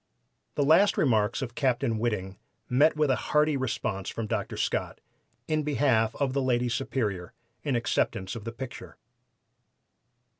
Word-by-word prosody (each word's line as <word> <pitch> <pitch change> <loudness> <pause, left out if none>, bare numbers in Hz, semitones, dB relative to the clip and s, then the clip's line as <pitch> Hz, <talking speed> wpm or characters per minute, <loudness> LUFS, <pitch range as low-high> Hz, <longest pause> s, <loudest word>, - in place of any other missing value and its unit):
The 145 - +2 0.3
remarks 110 -1 +2
of 120 -3 -5
Captain 120 -4 0
Whiting 100 -5 -2 0.3
met 145 +6 +4
with 150 -3 +2
a - - +3
hearty 150 +2 +2
response 110 -6 -2
from 115 - -4
Dr. 110 -2 -3
Scott, - - -2 0.5
in 155 0 +1
behalf 135 -7 +2
of 135 -2 -1
the 140 - +1
Lady 125 -1 +1
Superior, 115 - -2 0.3
in 140 -4 -1
acceptance 100 -4 -1
of 115 - -7
the 115 - -5
picture. 125 +1 -8
120 Hz, 140 wpm, -28 LUFS, 110-140 Hz, 0.5 s, met